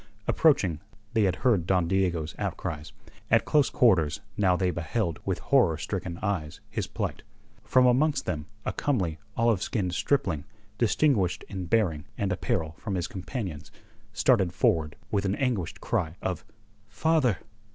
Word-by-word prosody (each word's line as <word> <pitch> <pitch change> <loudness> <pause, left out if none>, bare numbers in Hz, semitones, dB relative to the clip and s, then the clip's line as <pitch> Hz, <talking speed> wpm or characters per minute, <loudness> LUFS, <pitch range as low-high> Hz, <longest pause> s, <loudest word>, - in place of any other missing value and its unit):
Approaching, 85 -5 +3 0.3
they 110 -2 +3
had 95 -2 +1
heard 100 -9 +3
Don 90 -3 +2
Diego's 85 -4 0
outcries; 75 0 -4 0.4
at - - +4
close 145 -3 +3
quarters 90 -11 +3 0.2
now 95 -3 +3
they 90 0 +1
beheld 85 +2 -2
with - - 0
horror 80 -2 +3
stricken 90 0 -4
eyes 90 -8 -2
his - - -2
plight. - - -3 0.4
From 125 +4 +4
amongst 140 +5 +3
them 80 -4 -3 0.2
a - - -1
comely, 95 - 0 0.2
olive 115 -4 +3
skinned 95 -5 -1
stripling, 90 - 0 0.3
distinguished 115 - +2
in 95 -3 -5
bearing 85 -8 +1
and 100 -2 0
apparel 80 -3 -1
from 100 - -3
his 90 -1 -1
companions, 95 - -5 0.4
started 100 -9 +3
forward 75 -2 +1 0.2
with 100 - +1
an 100 0 0
anguished 120 - -1
cry 80 +1 -1
of 90 -3 -3 0.5
"Father!" 150 -4 +2
95 Hz, 145 wpm, -27 LUFS, 85-115 Hz, 0.5 s, at